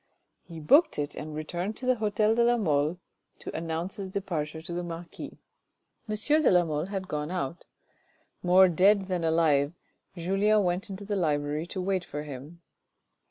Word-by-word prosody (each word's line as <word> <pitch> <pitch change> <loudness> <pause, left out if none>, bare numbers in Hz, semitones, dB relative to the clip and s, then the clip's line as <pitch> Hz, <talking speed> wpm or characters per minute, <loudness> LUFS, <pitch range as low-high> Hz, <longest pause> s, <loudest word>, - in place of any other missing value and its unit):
He 165 -2 -10
booked 285 - +4
it 145 0 -2
and 150 0 -7
returned 175 +7 -4
to 255 - -6
the 255 -1 +3
hotel 215 0 +2
de 235 +1 +3
la 240 +1 +4
Mole 155 -4 +1 0.4
to - - -8
announce 165 +3 -3
his 195 -2 -5
departure 165 -6 -3
to 170 +2 -7
the 175 - -2
marquis. 170 0 -8 0.7
M. 215 - 0
de 300 +7 +3
la 180 -1 +4
Mole 155 0 -2
had 190 -1 -4
gone 150 -1 -3
out. 175 -3 -4 0.7
More 185 +1 +6
dead 195 +4 +4
than 185 -3 -2
alive 160 -3 +2 0.4
Julien 200 +5 +2
went 180 +4 -1
into 195 +1 -7
the 205 0 -2
library 150 -2 0
to 185 - -5
wait 185 -1 0
for 150 -2 -6
him. 150 +4 -9
175 Hz, 170 wpm, -28 LUFS, 155-200 Hz, 0.7 s, More